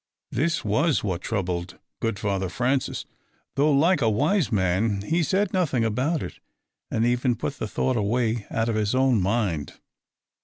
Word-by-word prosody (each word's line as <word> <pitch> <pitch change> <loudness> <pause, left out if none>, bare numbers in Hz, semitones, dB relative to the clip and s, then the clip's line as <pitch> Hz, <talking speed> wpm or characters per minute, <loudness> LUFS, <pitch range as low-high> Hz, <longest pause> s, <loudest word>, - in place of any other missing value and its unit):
_ - - -6
This 155 +4 0
was 145 +9 +2
what 95 -4 -2
troubled 90 -4 -3 0.2
good 115 -2 -1
Father 95 -2 -1
Francis, 130 - -1 0.5
though, 145 +2 +3
like 160 +4 +3
a 115 - +3
wise 150 - +1
man, 100 +1 +1
he 165 +10 +1
said 190 +4 +1
nothing 145 -11 +1
about 130 +9 0
it, - - -8 0.5
and 115 - +1
even 125 0 +2
put 140 - -4
the - - -2
thought 130 +4 0
away 115 +1 0
out 115 0 0
of 115 - 0
his 110 +2 0
own 130 -5 +3
mind. 95 -7 -1
115 Hz, 165 wpm, -25 LUFS, 100-140 Hz, 0.5 s, though